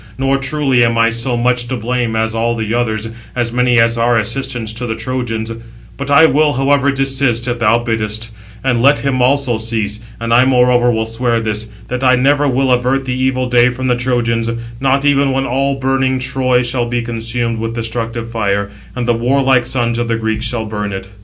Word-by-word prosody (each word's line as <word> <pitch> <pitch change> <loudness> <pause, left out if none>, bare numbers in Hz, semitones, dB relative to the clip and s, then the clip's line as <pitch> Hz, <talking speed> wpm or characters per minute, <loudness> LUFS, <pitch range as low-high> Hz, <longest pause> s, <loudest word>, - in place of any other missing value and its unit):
nor 135 +1 +1
truly 135 -2 +1
am 115 0 +1
I 115 0 +3
so 115 +1 0
much 120 0 +1
to 130 - -3
blame 120 0 -2
as 110 0 0
all 115 +1 0
the 110 -1 -3
others, 110 -2 -1 0.3
as 120 -2 -1
many 125 -1 +2
as 115 0 +3
are 120 0 +3
assistants 115 0 -1
to 120 +2 -3
the 110 - -2
Trojans, 115 -3 -3 0.4
But 140 0 -6
I 145 +3 +6
will, 150 -1 +3
however, 140 +1 +2
desist, 135 -3 0
if 120 -1 -2
thou 115 0 +3
biddest 110 -1 -2
it; 115 - -15 0.3
and 125 -3 +1
let 140 +3 +5
him 135 -2 -1
also 130 -2 +2
cease; 110 -2 -3 0.2
and 115 0 -1
I 125 +2 +6
moreover 125 -1 +3
will 110 -1 0
swear 115 +1 -1
this, 110 -1 -3 0.2
that 125 +1 -3
I 130 -1 +5
never 145 +3 +2
will 130 0 +1
avert 125 +2 +1
the 130 - -2
evil 130 0 0
day 125 0 +4
from 130 +1 -3
the 125 - +3
Trojans, 120 -2 0 0.3
not 135 +1 +1
even 140 -1 +3
when 135 0 0
all 135 +2 0
burning 135 0 0
Troy 130 -1 +1
shall 120 0 -1
be 120 0 -2
consumed 115 0 -2
with 115 +1 -4
destructive 115 0 -4
fire, 100 -2 -1 0.2
and 125 -1 -3
the 120 - +3
warlike 130 +1 +2
sons 120 -2 0
of 120 - -1
the 115 -1 0
Greeks 110 0 -2
shall 115 -1 -2
burn 105 -2 -4
it." 95 0 -6
120 Hz, 205 wpm, -15 LUFS, 115-130 Hz, 0.4 s, I